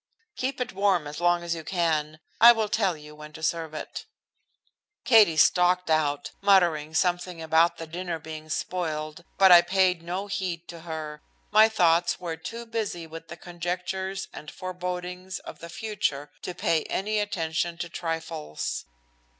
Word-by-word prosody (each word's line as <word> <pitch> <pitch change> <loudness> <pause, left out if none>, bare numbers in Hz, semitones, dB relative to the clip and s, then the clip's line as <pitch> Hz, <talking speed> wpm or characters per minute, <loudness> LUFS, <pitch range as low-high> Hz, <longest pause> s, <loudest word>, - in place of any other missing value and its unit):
"Keep 265 +1 -3
it 250 - -3
warm 190 -4 +2
as 150 +3 -7
long 175 0 +3
as 170 0 -1
you 165 -1 -6
can. 155 -3 -1 0.2
I 235 +2 +10
will 220 -2 -1
tell 195 -6 +1
you 150 0 -12
when 150 0 -11
to 160 - -10
serve 160 -1 -1
it." 440 - -7 1.0
Katie 220 -9 +6
stalked 180 +1 +4
out, 145 -2 +1
muttering 170 -6 +3
something 175 0 0
about 160 +1 +3
the 165 - -6
dinner 170 +1 -4
being 155 0 -9
spoiled, 155 -2 -3
but 190 -1 +7
I 175 -1 +10
paid 180 0 +2
no 180 +4 -4
heed 185 -4 -4
to 170 - -8
her. 155 -2 -6 0.3
My 215 +1 +7
thoughts 175 -4 +3
were 170 -2 -4
too 230 +9 -7
busy 220 -7 -3
with 165 +1 -10
conjectures 180 +2 -4
and 150 - -9
forebodings 180 0 -5
of - - -10
the 170 - -9
future 175 -8 -3
to 180 - -5
pay 160 -2 +1
any 210 +2 -1
attention 170 -4 -1
to 175 - -4
trifles. 165 - -4
175 Hz, 160 wpm, -26 LUFS, 160-190 Hz, 1.0 s, I